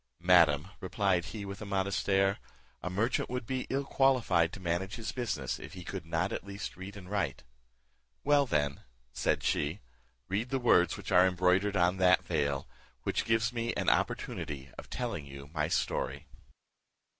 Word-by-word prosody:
"Madam," 85 -3 +5
replied 95 -2 +1
he, 105 -1 -6
with 100 +1 -7
a - - -4
modest 100 0 -1
air, 95 0 +3 0.4
"a 90 - -3
merchant 110 +7 0
would 125 -2 -3
be 130 +2 -3
ill 135 +1 0
qualified 120 -13 +3
to - - -8
manage 90 +2 -2
his 115 -2 -4
business 100 - -2
if - - -9
he 90 -2 -8
could 85 -2 -6
not 80 0 0
at - - -3
least 100 +1 -6
read 95 +2 -8
and 90 -2 -10
write." 100 -9 -1 0.8
"Well, 145 -1 +4
then," 75 - 0 0.3
said - - 0
she, 75 +7 0 0.5
"read 105 +6 -1
the 135 - 0
words 90 -8 +4
which - - -7
are 90 0 +7
embroidered 95 +2 +2
on 90 +1 +3
that 95 0 +4
veil, 70 -4 -1 0.4
which - - -1
gives 115 +1 +2
me 115 0 -2
an - - +2
opportunity 70 -2 -2
of - - -10
telling 115 - -3
you 70 +1 -10
my 75 -2 0
story." - - -1
95 Hz, 170 wpm, -31 LUFS, 85-110 Hz, 0.8 s, are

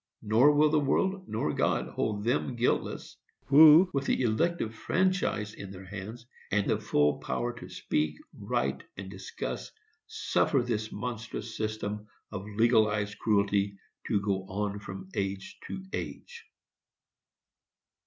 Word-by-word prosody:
Nor 115 +7 +5
will 150 +1 +4
the 155 - +4
world 185 +7 0
or 110 -9 0
God - - +1
hold 105 -1 -2
them 120 +1 0
guiltless 120 +1 -1 0.3
who, 155 +5 +8
with 140 -1 0
the - - +2
elective 120 +1 +1
franchise 175 - 0
in 100 - -8
their 95 -1 -10
hands, 105 +5 -8 0.3
and 105 0 +2
the 105 - +1
full 75 -9 +2
power 120 0 -2
to - - -9
speak, 75 0 -1 0.2
write 65 +1 -1
and 95 0 -7
discuss, 95 -1 -5 0.4
suffer 130 - +1
this 110 -2 -2
monstrous 110 0 -5
system 105 -1 -3 0.2
of 100 -2 -5
legalized 105 -2 +2
cruelty 100 -2 +1 0.3
to 100 - +2
go 100 -2 -1
on 105 +1 -2
from 95 -1 -8
age 95 -1 -3
to 190 - -6
age. 470 -1 -6
110 Hz, 135 wpm, -29 LUFS, 100-125 Hz, 0.4 s, who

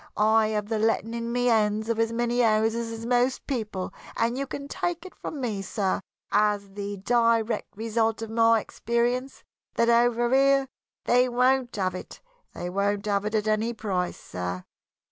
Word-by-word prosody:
I 220 +1 +4
have 210 -1 -2
the 220 0 -1
letting 225 +1 +1
in 235 0 -3
my 245 +1 0
hands 220 -3 +2
of 230 -1 -1
as 225 0 +2
many 240 +1 0
houses 225 0 +2
as 225 0 -6
most 245 +1 +1
people, 215 -8 -3 0.2
and 235 +1 +1
you 275 +1 -3
can 280 +1 -6
take 345 +3 -3
it 375 - -10
from 300 - -7
me, 220 -6 -2
sir, 195 0 -1 0.3
as 205 -1 +1
the 200 0 -5
direct 230 +1 +1
result 225 0 0
of 220 - -6
my 230 0 +4
experience, 240 +5 -2 0.3
that 235 - +3
over 240 0 +3
here 275 0 +4 0.4
they 250 +1 +4
won't 250 +1 +2
have 185 -3 0
it 185 - -8 0.4
won't 200 +3 -1
have 200 -1 0
it 215 +1 -2
at 215 0 0
any 215 +2 +1
price, 190 -5 -2
sir. 90 0 -5
225 Hz, 170 wpm, -26 LUFS, 210-240 Hz, 0.4 s, I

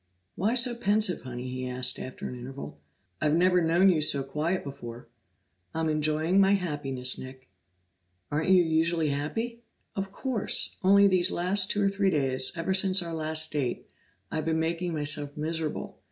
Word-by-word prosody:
"Why 215 +6 0
so 245 0 +4
pensive, 210 -4 +2
Honey?" 125 0 -6
he 130 0 -4
asked 125 0 -1
after 130 - -6
an - - -6
interval. 125 - -8 0.4
"I've 150 0 +2
never 180 +1 +4
known 170 +3 +4
you 165 -4 +2
so 140 -2 +3
quiet 155 +7 -2
before." 120 -4 -9 0.7
"I'm 160 0 0
enjoying 155 +4 +2
my 195 +1 +4
happiness, 145 -9 -2
Nick." 130 -2 -11 0.8
"Aren't 155 +4 0
you 185 -2 +6
usually 160 0 +1
happy?" 225 +12 -3 0.3
"Of 195 0 -3
course, 250 0 -1
only 200 +1 +6
these 185 -2 +3
last 185 +3 +1
two 205 - 0
or 195 - +3
three 195 0 +1
days, 130 -5 +1
ever 170 +2 -1
since 190 -1 +3
our 170 -1 -5
last 160 0 0
date, 140 -5 -3 0.4
I've 155 -1 -2
been 160 0 0
making 170 +2 -1
myself 145 -1 0
miserable. 160 0 -4
160 Hz, 165 wpm, -28 LUFS, 145-190 Hz, 0.8 s, you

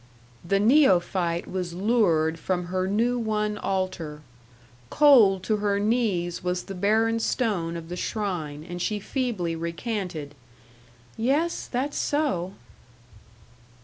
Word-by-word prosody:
The 195 +3 +1
neophyte 185 - +3
was 180 -2 -4
lured 175 -6 +2
from 180 0 -2
her 185 0 0
new 235 +5 +1
won 210 -2 -1
altar. 185 -6 -3 0.7
Cold 230 -11 +5
to 215 +1 +1
her 205 -1 0
knees 205 -6 0
was 180 0 -1
the 195 - -7
barren 220 +4 +2
stone 195 -9 -1
of 165 -1 -8
the 175 - -5
shrine; 175 -8 -3
and 175 0 -6
she 210 +3 -1
feebly 210 -8 -2
recanted, 170 -3 -4 0.9
"Yes, 290 +9 0
that's 265 +4 -2
so." 265 - -1
195 Hz, 115 wpm, -25 LUFS, 175-225 Hz, 0.9 s, Cold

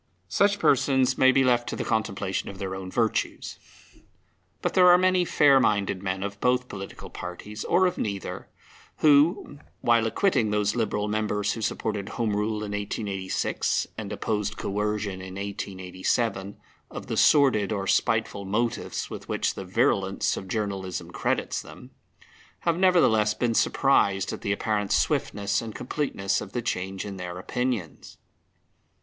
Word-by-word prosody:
Such 200 0 +3
persons 130 -6 +3
may 130 0 +5
be 135 0 +3
left 120 -2 +2
to - - -3
the - - -3
contemplation 100 -3 -2
of 100 - -9
their 95 -1 -4
own 95 -1 -6
virtues. 115 +2 -1 1.0
But - - 0
there 180 -1 +6
are 175 - +8
many 185 0 +3
fair 140 -4 +5
minded 100 -5 +1
men 95 0 -2
of 100 0 -5
both 125 0 +2
political 95 -1 -8
parties, 105 +4 -7
or 185 - +3
of 180 -1 -1
neither, 100 -3 -4 0.5
who, 150 +2 +4 0.2
while 115 -1 +3
acquitting 125 - +1
those 105 0 +1
Liberal 105 -3 -1
members 105 -1 0
who 115 - -6
supported 105 -2 -2
Home 110 -4 -1
Rule 105 +1 -1
in 105 - -5
1886 100 -2 -2
and - - -6
opposed 105 -1 -2
Coercion 105 -1 -2
in 95 0 -8
1887 100 +1 -3 0.3
of - - -8
the - - -3
sordid 130 -9 +4
or 100 -2 -2
spiteful 110 0 +1
motives 115 +4 -2
with - - -8
which - - 0
the 95 - -7
virulence 95 +1 +1
of 95 - -7
journalism 95 -3 -3
credits - - -1
them, - - -13 0.7
have 170 -1 +1
nevertheless 120 - +4
been 120 +1 0
surprised 100 -7 +2
at - - -7
the 100 - -1
apparent 105 0 -1
swiftness 100 0 +1
and 115 -2 -7
completeness 115 -7 -2
of - - -9
the 120 - -1
change 95 -2 -3
in 100 -2 -6
their 90 -1 -6
opinions. 115 - -4
105 Hz, 150 wpm, -26 LUFS, 100-125 Hz, 1.0 s, are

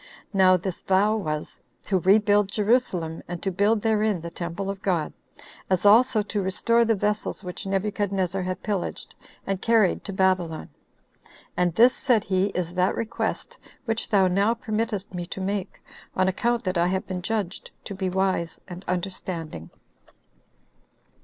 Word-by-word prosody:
Now 185 -1 +5
this 180 0 -5
vow 200 +3 +3
was, 155 -8 -4 0.2
"to 190 -2 +1
rebuild 205 +2 +4
Jerusalem, 200 -7 0
and 175 0 -5
to 195 - 0
build 205 +4 +2
therein 215 -3 +2
the 170 0 -7
temple 175 +3 -4
of 195 0 -4
God; 175 -6 0 0.6
as 185 0 +1
also 220 +1 +5
to 210 0 -2
restore 230 +5 +2
the 225 -1 +2
vessels 210 0 -1
which 180 +1 -6
Nebuchadnezzar 195 -1 -1
had 185 0 -4
pillaged, 200 -4 -3 0.3
and 195 -1 -2
carried 225 -5 +3
to 200 - -3
Babylon. 185 -4 0 0.9
And 175 -2 +1
this," 245 +3 +6
said 235 -6 +2
he, 190 0 +1
"is 180 -3 -3
that 185 +1 +1
request 230 -1 -3 0.3
which 225 -1 -2
thou 195 -3 +4
now 200 +5 +2
permittest 215 -3 -3
me 175 -1 -4
to 190 - -6
make, 195 0 -3 0.3
on 185 0 +2
account 235 +5 0
that 185 -3 -1
I 170 - +3
have 190 +1 -1
been 185 -1 -4
judged 200 -2 -3 0.2
to - - -5
be 190 -1 -2
wise 185 -2 -1
and 180 0 -8
understanding." 175 - -4
195 Hz, 155 wpm, -25 LUFS, 180-210 Hz, 0.9 s, this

